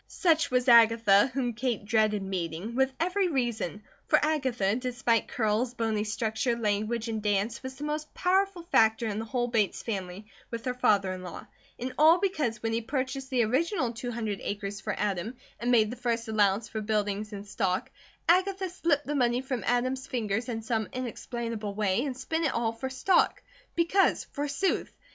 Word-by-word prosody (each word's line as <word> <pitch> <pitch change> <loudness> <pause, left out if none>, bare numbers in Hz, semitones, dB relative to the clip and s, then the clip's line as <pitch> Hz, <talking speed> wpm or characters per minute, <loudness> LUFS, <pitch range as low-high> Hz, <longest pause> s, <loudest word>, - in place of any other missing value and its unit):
Such 335 -2 +2
was 250 0 +1
Agatha, 230 -3 +6
whom 250 -2 -1
Kate 235 -3 -2
dreaded 215 -2 +2
meeting, 185 +2 -4
with 265 +2 +2
every 365 +3 +1
reason, 235 - -2 0.2
for - - +5
Agatha, 260 -10 +1
despite 245 -2 0
curls, 230 +2 0
bony 220 -2 0
structure, 220 +2 -1
language, 215 +1 -1
and 220 -1 -2
dance, 205 +2 0
was 260 0 -7
the 285 - -8
most 300 0 -3
powerful 375 -1 +1
factor 225 -8 +3
in 215 -1 -2
the 225 - -4
whole 240 +1 -1
Bates 225 -5 0
family 195 -2 -4 0.2
with 230 +1 -6
her 250 - 0
father 200 -6 +2
in 185 - -7
law; 180 -2 -8 0.3
and 255 +1 -4
all 320 +3 +7
because 295 - -1
when 225 0 0
he 230 - 0
purchased 265 +2 -3
the 250 -3 +2
original 260 - 0
two 245 +2 -5
hundred 220 -4 -3
acres 200 -1 -4
for 210 0 -3
Adam, 210 +3 -2 0.2
and 240 - -1
made 220 -3 +4
the - - -5
first 235 -2 -2
allowance 210 0 +2
for 220 - -4
buildings 210 0 -1
and 200 -1 -7
stock, 190 -3 -1 0.4
Agatha 375 +2 +2
slipped 315 -5 0
the 295 - -2
money 245 -3 +2
from 260 -5 -3
Adam's 255 +2 0
fingers 225 -1 -2
in 225 -2 -3
some 220 -1 -1
inexplainable 230 -4 -4
way, 210 +2 +1
and 260 -3 -4
spent 320 +5 -2
it 295 - +1
all 230 -1 0
for 260 +3 -5
stock; 315 +8 +2 0.3
because 345 +3 +3
forsooth! 290 +6 -1
235 Hz, 180 wpm, -28 LUFS, 215-265 Hz, 0.4 s, all